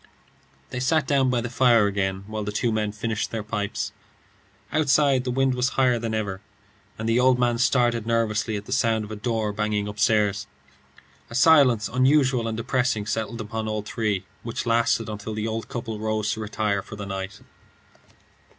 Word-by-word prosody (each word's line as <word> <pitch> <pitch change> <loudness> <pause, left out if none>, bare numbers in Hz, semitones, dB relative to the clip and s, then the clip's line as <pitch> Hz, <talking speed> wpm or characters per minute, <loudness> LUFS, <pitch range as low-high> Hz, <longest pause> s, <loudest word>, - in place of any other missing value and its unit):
They 125 - -3
sat 145 +3 +2
down 135 -2 +2
by 125 -1 +1
the 120 - -4
fire 120 -3 +4
again 95 -1 -1
while 110 +1 -4
the 105 - -3
two 115 +3 0
men 105 -1 -1
finished 110 0 -3
their 110 -2 -4
pipes. 105 -1 -3 0.8
Outside, 140 -3 +3
the - - -1
wind 135 +1 +2
was 125 +1 +1
higher 125 -3 +3
than 115 -1 -2
ever, 100 -3 -3 0.6
and 110 - -4
the 115 +2 +3
old 130 0 +4
man 120 -1 +1
started 120 -3 +2
nervously 110 -1 0
at 100 0 -5
the - - -10
sound 110 -1 +2
of 105 - -11
a - - -4
door 110 -1 -1
banging 105 0 -1
upstairs. 105 0 +1 0.8
A 115 - -8
silence 135 -6 +5
unusual 130 -2 +2
and 110 -1 -3
depressing 125 -2 0
settled 110 +2 -3
upon 110 +1 -4
all 110 -1 -2
three, 105 -3 -2 0.2
which 115 -1 -4
lasted 115 -1 +2
until 105 0 -5
the 110 +1 -2
old 110 0 -4
couple 115 -3 -5
rose 110 -1 -1
to - - -6
retire 105 -2 -1
for 110 - -10
the 100 -1 -6
night. 95 +1 -5
110 Hz, 180 wpm, -24 LUFS, 105-125 Hz, 0.8 s, silence